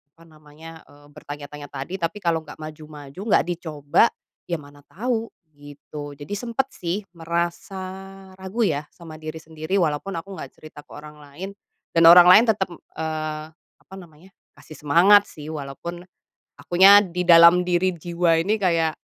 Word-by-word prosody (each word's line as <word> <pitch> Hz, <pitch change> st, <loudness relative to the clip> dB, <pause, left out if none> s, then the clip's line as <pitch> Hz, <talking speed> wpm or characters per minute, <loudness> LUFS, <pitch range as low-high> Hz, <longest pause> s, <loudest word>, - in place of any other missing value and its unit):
apa 165 Hz, -, -20 dB
namanya, 155 Hz, +1 st, -14 dB
eee, 145 Hz, 0 st, -19 dB
bertanya-tanya 145 Hz, 0 st, -9 dB
tadi, 140 Hz, +7 st, -6 dB
tapi, 165 Hz, +5 st, -2 dB
kalau 165 Hz, -1 st, 0 dB
nggak 155 Hz, -, -13 dB
maju-maju, 155 Hz, 0 st, -10 dB
nggak -, -, +2 dB
dicoba, 160 Hz, +1 st, +1 dB, 0.4 s
ya 170 Hz, -, -1 dB
mana 145 Hz, 0 st, -16 dB
tau, 230 Hz, +2 st, -3 dB, 0.3 s
gitu. 145 Hz, 0 st, -10 dB
Jadi, 145 Hz, +7 st, -8 dB
sempet 245 Hz, +3 st, -2 dB
sih 180 Hz, +4 st, -4 dB
merasa 170 Hz, +3 st, -3 dB, 0.6 s
ragu, 190 Hz, +5 st, -2 dB
ya, 150 Hz, -2 st, -2 dB
sama 160 Hz, -2 st, -12 dB
diri 155 Hz, +1 st, -7 dB
sendiri, 160 Hz, +3 st, -5 dB
walaupun 160 Hz, +5 st, -2 dB
aku 195 Hz, +4 st, -8 dB
nggak -, -, -8 dB
cerita 155 Hz, -1 st, -14 dB
ke -, -, -24 dB
orang 150 Hz, 0 st, -12 dB
lain, 145 Hz, +7 st, -9 dB, 0.5 s
dan 165 Hz, -, +4 dB
orang 175 Hz, 0 st, +9 dB
lain 220 Hz, +6 st, +7 dB
tetep, 195 Hz, -3 st, 0 dB
eee, 155 Hz, -2 st, -6 dB
apa 190 Hz, +3 st, -19 dB
namanya, 170 Hz, +2 st, -17 dB, 0.3 s
kasih 150 Hz, +2 st, -14 dB
semangat, 195 Hz, +7 st, +6 dB
sih, 150 Hz, 0 st, -10 dB
walaupun 155 Hz, +4 st, -7 dB, 0.6 s
akunya 195 Hz, +3 st, +6 dB
di 180 Hz, +1 st, -3 dB
dalam 170 Hz, +1 st, +7 dB
diri 180 Hz, +1 st, +1 dB
jiwa 170 Hz, 0 st, 0 dB
ini 205 Hz, +6 st, 0 dB
kayak 165 Hz, -4 st, +1 dB
165 Hz, 155 wpm, -22 LUFS, 150-180 Hz, 0.6 s, orang